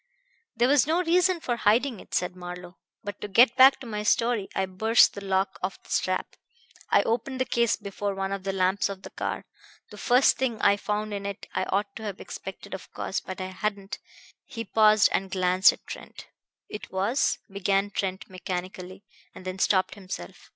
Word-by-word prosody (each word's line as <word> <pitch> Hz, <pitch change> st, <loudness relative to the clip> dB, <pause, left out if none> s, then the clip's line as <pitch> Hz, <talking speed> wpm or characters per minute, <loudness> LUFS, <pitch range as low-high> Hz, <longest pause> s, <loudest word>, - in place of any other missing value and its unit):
"There 240 Hz, +2 st, +3 dB
was 280 Hz, 0 st, +4 dB
no 335 Hz, +3 st, +2 dB
reason 360 Hz, +1 st, +3 dB
for 240 Hz, -5 st, -2 dB
hiding 230 Hz, +2 st, +2 dB
it," -, -, -7 dB
said 180 Hz, 0 st, -1 dB
Marlowe. 180 Hz, 0 st, -9 dB, 0.2 s
"But 205 Hz, -1 st, -7 dB
to -, -, -4 dB
get 235 Hz, +4 st, +5 dB
back 265 Hz, +1 st, +7 dB
to -, -, -8 dB
my 210 Hz, -3 st, -4 dB
story. 230 Hz, 0 st, +1 dB
I 190 Hz, -, +1 dB
burst 220 Hz, +5 st, +4 dB
the 200 Hz, -, -8 dB
lock 190 Hz, 0 st, 0 dB
of 185 Hz, +1 st, -3 dB
the -, -, -15 dB
strap. 185 Hz, 0 st, -1 dB, 0.5 s
I -, -, +4 dB
opened 245 Hz, +3 st, -2 dB
the 260 Hz, -, +1 dB
case 235 Hz, -1 st, +2 dB
before 200 Hz, 0 st, -4 dB
one 195 Hz, 0 st, -3 dB
of 195 Hz, -1 st, -3 dB
the 195 Hz, -, -1 dB
lamps 190 Hz, +1 st, +1 dB
of 195 Hz, -1 st, -7 dB
the -, -, -9 dB
car. -, -, -4 dB, 0.5 s
The -, -, -10 dB
first 250 Hz, +2 st, +4 dB
thing 245 Hz, -4 st, -1 dB
I 200 Hz, -, +4 dB
found 210 Hz, +1 st, -3 dB
in 200 Hz, 0 st, -4 dB
it 200 Hz, 0 st, -7 dB
I -, -, 0 dB
ought 200 Hz, 0 st, -1 dB
to 220 Hz, -, -9 dB
have 205 Hz, -3 st, -5 dB
expected, 195 Hz, +1 st, -8 dB
of 190 Hz, -, -8 dB
course; -, -, -2 dB
but 185 Hz, 0 st, -8 dB
I 185 Hz, 0 st, -4 dB
hadn't." 200 Hz, +1 st, -4 dB, 0.5 s
He 230 Hz, -2 st, -6 dB
paused 215 Hz, +1 st, +5 dB
and 190 Hz, 0 st, -1 dB
glanced 185 Hz, 0 st, +4 dB
at -, -, -14 dB
Trent. -, -, -9 dB, 0.4 s
"It 210 Hz, -, -8 dB
was 200 Hz, +8 st, +1 dB
" -, -, -28 dB
began 200 Hz, +1 st, +1 dB
Trent 190 Hz, -1 st, -3 dB
mechanically; 185 Hz, +1 st, -6 dB, 0.3 s
and 185 Hz, -, -11 dB
then 185 Hz, +1 st, -5 dB
stopped 190 Hz, -1 st, +2 dB
himself. 185 Hz, -, -9 dB
200 Hz, 200 wpm, -26 LUFS, 190-225 Hz, 0.5 s, back